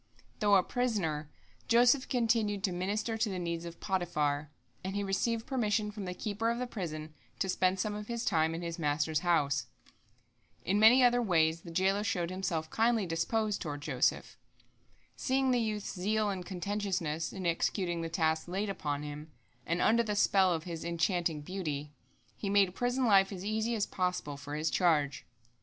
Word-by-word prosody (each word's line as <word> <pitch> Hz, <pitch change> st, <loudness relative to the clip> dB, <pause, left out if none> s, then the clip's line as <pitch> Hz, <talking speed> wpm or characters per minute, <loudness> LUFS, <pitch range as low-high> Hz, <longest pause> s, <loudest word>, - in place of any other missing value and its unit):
Though 205 Hz, -2 st, +4 dB
a 190 Hz, -, +5 dB
prisoner, 180 Hz, -13 st, -1 dB, 0.4 s
Joseph 245 Hz, +3 st, +4 dB
continued 225 Hz, -5 st, +1 dB
to 195 Hz, -, +1 dB
minister 210 Hz, +5 st, -2 dB
to 220 Hz, -, +1 dB
the 190 Hz, -, -3 dB
needs 170 Hz, -1 st, -3 dB
of 170 Hz, 0 st, -8 dB
Potiphar, 150 Hz, -6 st, -1 dB, 0.3 s
and 190 Hz, +1 st, -4 dB
he 205 Hz, -, 0 dB
received 225 Hz, +4 st, -1 dB
permission 215 Hz, -5 st, 0 dB
from 205 Hz, -2 st, -6 dB
the 180 Hz, 0 st, -4 dB
keeper 215 Hz, +3 st, -2 dB
of 235 Hz, -, 0 dB
the 250 Hz, -, -2 dB
prison 155 Hz, -9 st, -5 dB, 0.2 s
to 195 Hz, -, -1 dB
spend 185 Hz, 0 st, +1 dB
some 210 Hz, +2 st, -1 dB
of 210 Hz, 0 st, -6 dB
his 235 Hz, 0 st, -3 dB
time 160 Hz, -3 st, +2 dB
in 170 Hz, -, -5 dB
his 170 Hz, 0 st, -4 dB
master's 150 Hz, 0 st, +1 dB
house. 145 Hz, -7 st, +1 dB, 1.0 s
In 200 Hz, +3 st, +2 dB
many 235 Hz, +4 st, +7 dB
other 245 Hz, 0 st, +4 dB
ways 165 Hz, -6 st, +2 dB
the 170 Hz, -, -10 dB
jailer 190 Hz, +4 st, +1 dB
showed 180 Hz, -6 st, -1 dB
himself 175 Hz, -4 st, -2 dB
kindly 225 Hz, -2 st, +2 dB
disposed 200 Hz, +6 st, -1 dB
toward 145 Hz, -4 st, -4 dB
Joseph. -, -, 0 dB, 0.8 s
Seeing 265 Hz, 0 st, +1 dB
the 245 Hz, -, +3 dB
youth's 215 Hz, -2 st, -3 dB
zeal 210 Hz, +3 st, 0 dB
and 185 Hz, -2 st, -4 dB
conscientiousness 180 Hz, -4 st, -2 dB
in 190 Hz, -2 st, -6 dB
executing 175 Hz, 0 st, 0 dB
the 165 Hz, -, -3 dB
tasks 160 Hz, -1 st, 0 dB
laid 195 Hz, +3 st, -2 dB
upon 145 Hz, -6 st, -3 dB
him, 150 Hz, +1 st, -7 dB, 0.4 s
and 170 Hz, +1 st, +1 dB
under 230 Hz, +2 st, +4 dB
the 215 Hz, -3 st, -2 dB
spell 195 Hz, -2 st, +4 dB
of 165 Hz, -2 st, -1 dB
his 170 Hz, -3 st, -6 dB
enchanting 170 Hz, -2 st, 0 dB
beauty, 150 Hz, -4 st, -4 dB, 0.4 s
he 200 Hz, -, -4 dB
made 195 Hz, -2 st, +4 dB
prison 245 Hz, +4 st, 0 dB
life 195 Hz, -3 st, +5 dB
as 190 Hz, -1 st, -6 dB
easy 220 Hz, +2 st, 0 dB
as 210 Hz, -, 0 dB
possible 180 Hz, -5 st, -2 dB
for 145 Hz, +1 st, -7 dB
his 155 Hz, +1 st, -1 dB
charge. 150 Hz, -6 st, +1 dB
185 Hz, 180 wpm, -31 LUFS, 165-215 Hz, 1.0 s, many